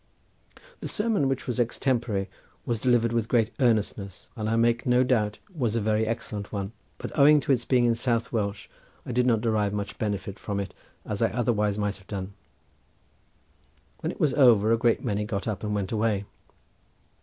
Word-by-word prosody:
The - - -5
sermon, 210 -10 +1
which 135 -1 -2
was 125 0 -3
extempore, 120 -4 0 0.4
was 115 -3 -2
delivered 120 -2 +3
with 115 -1 0
great 115 -1 +2
earnestness, 105 -5 0
and 110 -2 -2
I 115 - +1
make 115 +1 +2
no 125 +1 +4
doubt 110 -5 +1 0.2
was 120 -7 0
a - - +2
very 110 +1 +1
excellent 110 -2 -4
one, 100 -1 -3 0.3
but - - -7
owing 150 +1 +7
to 140 - 0
its 125 -3 +1
being 125 -2 +3
in 120 - +4
South 115 -1 -1
Welsh 100 -3 -2 0.4
I - - -5
did 125 +1 +2
not 115 -3 +3
derive 105 -3 +1
so - - -2
much 100 -1 -5
benefit 100 -2 -3
from 100 -1 -3
it 100 - -4 0.3
as 105 0 -4
I 115 - +3
otherwise 110 -4 0
might 105 -1 -1
have 95 - -20
done. 100 -1 -5 1.7
When - - -2
it - - -12
was 145 -4 +2
over 115 -6 +5
a 115 - +4
great 115 -1 +2
many 105 -3 0
got 105 -1 -3
up 105 -2 -3
and 105 -1 -1
went 100 -2 -2
away. 105 -2 0
115 Hz, 190 wpm, -26 LUFS, 105-120 Hz, 1.7 s, owing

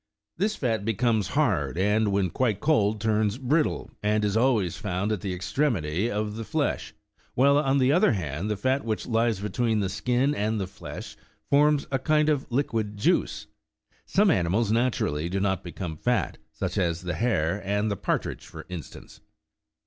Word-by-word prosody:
This 210 +5 0
fat 115 -6 -1
becomes 110 -2 +1
hard, - - +1
and 105 +2 +2
when 100 -3 +1
quite 115 -6 0
cold 110 -7 +2
turns 110 0 +1
brittle, 145 +4 0
and 105 0 +1
is 100 0 0
always 110 -7 +2
found 100 0 -2
at 105 -4 -1
the 95 - -3
extremity 95 - 0
of 105 0 -2
the 115 - -4
flesh; - - -2 0.4
while, 140 +3 +5
on 135 -2 +2
the 130 0 +3
other 155 -5 +4
hand, 85 0 -3
the 105 - -1
fat 130 +6 0
which 110 -2 -2
lies 115 -3 +1
between 110 +2 0
the 100 -2 0
skin 125 +8 +1
and 110 -2 -1
the 95 - -1
flesh 95 +3 -9 0.4
forms 145 0 +4
a 135 - +1
kind 150 +3 +2
of 145 -3 0
liquid 110 -5 -1
juice. 100 - +1 0.6
Some 200 0 +4
animals 100 - +1
naturally 110 -10 0
do 95 +2 -1
not 95 -2 0
become 85 -2 -6
fat, 120 +8 0
such 95 +4 -3
as 85 -2 0
the 90 -1 -2
hare 100 -5 0
and 105 +2 0
the - - 0
par - - 0
tridge, - - -7
for - - -10
instance. 90 -4 -9
110 Hz, 175 wpm, -26 LUFS, 95-125 Hz, 0.6 s, while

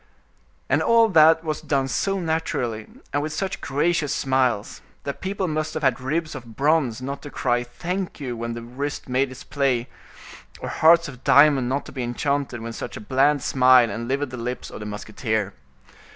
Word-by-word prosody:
And - - +2
all 230 -1 +5
that 160 -2 +6
was 155 -2 -3
done 135 -2 0
so 195 +8 -1
naturally, 160 -10 -2 0.3
and 145 - +1
with 155 +1 -3
such 190 +3 -3
gracious 150 +2 0
smiles, 130 -5 0 0.2
that 140 - -5
people 190 0 -2
must 155 0 -2
have 155 - -3
had 135 -1 +2
ribs 155 +4 -2
of 120 -5 -10
bronze 135 -4 +1
not 140 +2 -5
to 145 - -8
cry 120 -3 0
thank 175 +11 -4
you 130 -4 -4
when 115 0 -4
the 120 - -7
wrist 140 +5 -5
made 130 +1 +1
its 130 0 -10
play, 130 -4 0 0.7
or - - -5
hearts 170 +1 +5
of 130 -3 -11
diamond 140 -4 +5
not 140 +2 -1
to - - -10
be 130 - -5
enchanted 125 +1 -2
when 115 0 -6
such - - -6
a - - -6
bland 135 +5 +2
smile 125 -3 +5
enlivened 130 +5 -2
the 125 - -6
lips 125 +2 -5
of - - -8
the 105 - -6
musketeer. 105 0 -3
135 Hz, 185 wpm, -23 LUFS, 120-155 Hz, 0.7 s, that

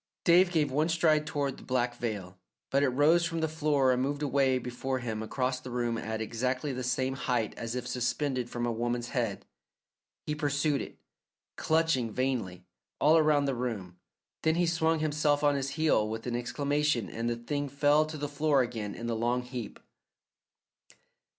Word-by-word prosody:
David 175 +1 +5
gave 150 -5 +1
one 155 +5 +1
stride 155 -2 +3
toward 140 -4 -2
the - - -13
black 125 -1 0
veil, 100 -7 -5 0.3
but 140 - +3
it 140 - +3
rose 150 +7 +4
from 165 -1 -1
the 160 - +1
floor 150 -4 +2
and 125 0 +1
moved 145 +2 -1
away 135 -2 +2
before 125 +1 -3
him 115 -3 -4
across 125 +3 -1
the 130 - -9
room 120 -1 -1
at 110 0 -3
exactly 125 +5 -2
the 130 - -4
same 130 +1 0
height 125 -4 -1
as 115 +1 -5
if 125 -1 -4
suspended 125 +1 -1
from 120 0 -3
a 120 - 0
woman's 120 +1 -2
head. 115 -6 -2 0.8
He 150 - -1
pursued 145 -1 0
it, - - -8 0.6
clutching 160 -7 +1
vainly, 110 -8 -2 0.3
all 155 +2 +5
around 150 -3 +4
the 135 - 0
room, 105 -8 -4 0.4
then 160 0 +2
he 175 +1 +2
swung 165 -1 +2
himself 150 -1 +1
on 145 -1 +4
his 140 -1 -1
heel 150 -9 +2
with 110 +1 -5
an 120 -1 -2
exclamation 145 0 0
and 115 +1 -3
the 120 - 0
thing 145 +5 -3
fell 145 +2 +3
to 155 0 -6
the 145 0 -3
floor 145 -1 +2
again 110 -4 -5
in 115 - -6
the 115 -1 -1
long 120 +2 0
heap. 125 -2 -7
130 Hz, 180 wpm, -30 LUFS, 120-150 Hz, 0.8 s, David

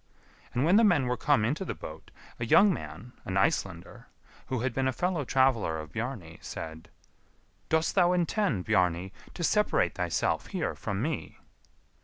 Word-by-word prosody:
And 125 +4 +2
when 180 +5 +5
the 230 - +6
men 175 - +4
were 125 0 0
come 130 -2 +2
into 145 - -1
the - - -4
boat, 80 +1 -10 0.3
a 120 - -1
young 200 - +6
man, 125 -6 -8
an 95 - -2
Icelander, 95 -2 -1 0.4
who 130 -3 -2
had 130 -1 -1
been 130 +2 0
a - - +2
fellow 175 +3 -1
traveller 130 -11 +2
of 75 -1 -8
Bjarni, 110 -8 -5
said, 80 0 -7 0.8
"Dost 160 0 +2
thou 180 -2 +4
intend, 175 - 0
Bjarni, 95 -2 +1 0.2
to 170 - -4
separate 210 - +2
thyself - - -1
here 185 -5 -2
from 100 +1 -3
me." 155 0 -3
130 Hz, 165 wpm, -29 LUFS, -, 0.8 s, the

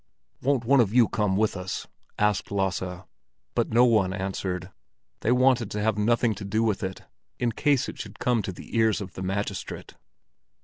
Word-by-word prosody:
"Won't 135 -3 +1
one 135 +3 +5
of 110 -1 +2
you 120 -3 +6
come 100 -3 0
with 110 0 +1
us?" 95 0 -4 0.3
asked 105 -2 +1
Lasse. 95 -2 -2 0.5
But - - 0
no 120 +2 +5
one 105 -6 +3
answered; 95 -1 -3 0.5
they 115 - +1
wanted 125 -3 +3
to 105 - -3
have 110 -1 +2
nothing 115 +2 +2
to 100 - -8
do 110 +3 0
with 110 -4 0
it, 95 -1 -5 0.3
in 120 -1 0
case 140 +2 +1
it - - -8
should - - -8
come 120 -3 +1
to 95 - -4
the 90 - -10
ears 110 -2 +3
of 100 -3 -7
the - - -7
magistrate. 95 +1 -4
105 Hz, 185 wpm, -26 LUFS, 95-115 Hz, 0.5 s, you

